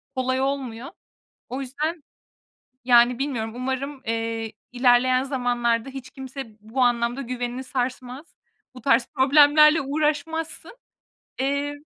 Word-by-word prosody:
kolay 260 0 0
olmuyor. 265 -3 -3 0.6
O 260 +2 -4
yüzden, 300 +5 -3 0.8
yani, 240 -1 +5
bilmiyorum 245 -6 -2
umarım, 265 +2 -4
eee, 225 -1 -3 0.2
ilerleyen 255 +1 +3
zamanlarda 245 -3 0
hiç 270 -1 -9
kimse 265 -4 -8
bu 220 +5 -3
anlamda 240 +1 +1
güvenini 250 0 -4
sarsmaz. 255 +2 -4 0.5
Bu 250 - -11
tarz 240 -1 +3
problemlerle 295 +3 +6
uğraşmazsın. 310 - -2 0.6
Eee, 280 +2 -1
260 Hz, 105 wpm, -24 LUFS, 245-280 Hz, 0.8 s, problemlerle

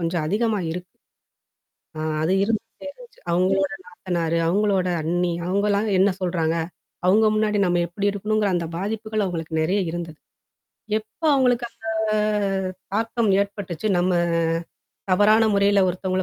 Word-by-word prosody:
கொஞ்சம் 165 -1 -1
அதிகமா 215 +3 0
இருக்கு. 180 +1 -8 1.1
ஆ - - -3 0.2
அது 165 +4 +1
இருந்துட்டே 225 +4 -4
இருந்துச்சு. - - -17
அவங்களோட 190 +2 +2
நாத்தனாரு, 170 -2 -2
அவங்களோட 195 -1 +1
அண்ணி 175 +2 0
அவங்கலாம் 200 +3 +1
என்ன 195 +1 +5
சொல்றாங்க? 170 -3 0 0.5
அவங்க 215 +4 +5
முன்னாடி 215 -1 +1
நம்ம 175 0 +2
எப்படி 200 +4 -1
இருக்கணுங்கற 210 0 0
அந்த 170 -1 -2
பாதிப்புகள் 215 +2 -2
அவங்களுக்கு 165 -3 -3
நெறைய 190 +5 +1
இருந்தது. 165 -2 -6 0.8
எப்ப 220 - -22
அவங்களுக்கு 245 -2 +2
அந்த? - - -29 1.1
தாக்கம் 225 0 +1
ஏற்பட்டுச்சு. 200 -1 -4
நம்ம 180 +1 +2 1.0
தவறான 215 +3 +5
முறைல 200 0 +4
ஒருத்தங்கள 185 +1 -1
195 Hz, 120 wpm, -23 LUFS, 175-215 Hz, 1.1 s, என்ன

